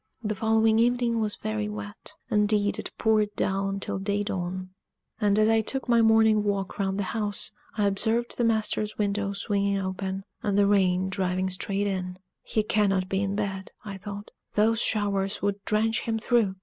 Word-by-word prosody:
The 215 0 -1
following 220 +1 +3
evening 240 -1 +2
was 215 -2 -1
very 105 -1 -3
wet; 105 -1 -7 0.2
indeed, 210 -1 +2
it - - -5
poured 215 -2 +2
down 195 0 0
till 195 - -4
day 200 +1 -1
dawn; 185 -2 -4 0.5
and 205 -2 +2
as 215 0 +4
I 225 0 +4
took 265 +5 -2
my 235 -1 +4
morning 220 -1 +5
walk 200 -1 -2
round 195 -1 0
the 205 - 0
house, 210 -3 -1 0.3
I 210 - +2
observed 220 +4 0
the 240 - 0
master's 215 -2 +1
window 205 -1 0
swinging 200 0 0
open, 190 0 -3 0.2
and 205 -4 0
the 205 - +5
rain 190 -2 +3
driving 185 0 -1
straight 195 +2 -1
in. 185 -2 -3 0.2
"He 215 - -1
cannot 195 -3 +1
be 195 0 0
in 200 0 -1
bed," 195 -2 -3
I 195 -2 -6
thought: 205 +1 -8 0.2
"those 225 +2 +3
showers 200 -2 0
would 200 0 -1
drench 220 +1 +1
him 225 -1 -1
through! 220 -3 +1
205 Hz, 175 wpm, -27 LUFS, 195-220 Hz, 0.5 s, morning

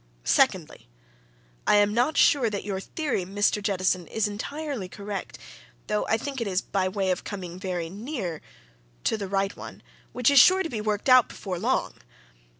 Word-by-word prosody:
Secondly - - +1 0.8
I - - +5
am 205 0 +4
not 245 +7 +1
sure 275 -8 +4
that 205 -2 -4
your 195 -2 -3
theory, 285 - -2
Mr. 205 +3 0
Jettison, 185 -3 0
is 220 -2 0
entirely 255 0 -5
correct, 200 0 -6 0.5
though 210 0 -1
I 225 - +2
think 270 +2 -5
it 230 - -1
is 185 -2 +1
by 190 -2 -1
way 190 0 -1
of 180 - -2
coming 180 -3 -7
very 180 -3 -3
near 200 - -5 0.6
to - - +1
the 205 -3 -4
right 195 +1 -1
one - - -10 0.3
which 250 +2 +2
is 280 - +7
sure 375 +7 +6
to 330 - -4
be 220 -6 -4
worked 210 +1 -2
out 255 -2 +6
before 185 -4 -5
long. - - -1
205 Hz, 175 wpm, -26 LUFS, 190-240 Hz, 0.8 s, is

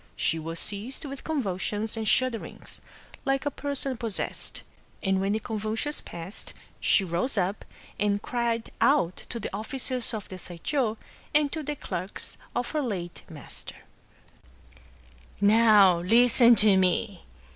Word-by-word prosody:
She 165 - +1
was 165 +1 -5
seized 215 +8 -4
with 275 -1 -7
con 310 -4 -1
vulsions 205 +3 -2
and 220 -1 -3
shudderings, 255 -1 0 0.4
like 270 +1 0
a 290 - +1
person 275 -2 -3
possessed; 225 -4 -1 0.4
and 190 -2 +2
when 195 +1 +1
the 215 - 0
convulsions 220 +6 -1
passed, 170 +4 -5 0.2
she 195 - +5
rose 185 +8 -1
up, 195 +2 0 0.4
and 205 0 +2
cried 235 0 -1
out 270 - +4
to 235 - -4
the - - -4
officers 250 +1 -2
of 210 - -6
the 185 - -8
Saisho, 220 - -1 0.4
and 295 -2 +4
to 315 - -3
the 295 0 -3
clerks 185 -7 -5 0.2
of 245 - -1
her 305 - 0
late 185 -9 -4
master: 150 -3 -8 0.9
— - - -25
"Now 205 -4 +6
listen 235 +5 +6
to 210 -2 +5
me! 185 +1 +1
215 Hz, 145 wpm, -27 LUFS, 190-255 Hz, 0.9 s, Now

